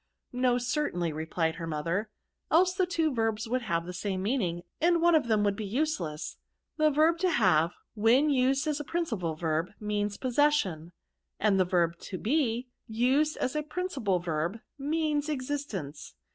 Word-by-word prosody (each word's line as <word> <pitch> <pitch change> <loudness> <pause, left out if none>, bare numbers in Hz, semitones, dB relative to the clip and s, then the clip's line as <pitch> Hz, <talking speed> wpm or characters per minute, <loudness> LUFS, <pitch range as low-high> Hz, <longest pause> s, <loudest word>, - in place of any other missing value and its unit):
'* - - -55
" - - -48
No, 250 0 +2
certainly," 245 - -1
replied 160 +1 -1
her 165 -1 -5
mother, 165 +7 -2 0.4
"else 365 +3 +4
the 370 -1 +1
two 325 -4 0
verbs 225 -2 -1
would 250 +2 0
have 170 -7 -1
the 180 - -6
same 190 +1 -3
meaning, 190 -7 -1 0.2
and 340 +1 +4
one 345 +1 +4
of 310 -6 +3
them 215 -2 +2
would 200 -1 +1
be 215 - -5
useless. 195 - -2 0.4
The 310 -1 +4
verb 315 +3 +3
to 370 0 +2
have, 180 - +3 0.2
when 240 +7 +4
used 270 +2 +2
as 300 -1 -1
a - - -3
principal 225 - -2
verb, 160 +1 -1
means 210 -1 -2
possession; 250 - +1 0.5
and 200 -2 +3
the 185 - +4
verb 170 -2 +1
to 185 - -6
be, 245 - 0 0.2
used 260 +7 +2
as 255 - -2
a 300 - +1
principal 300 - -1
verb, 170 +3 -2 0.2
means 300 0 0
existence. 255 - -4
225 Hz, 175 wpm, -29 LUFS, 180-295 Hz, 0.5 s, else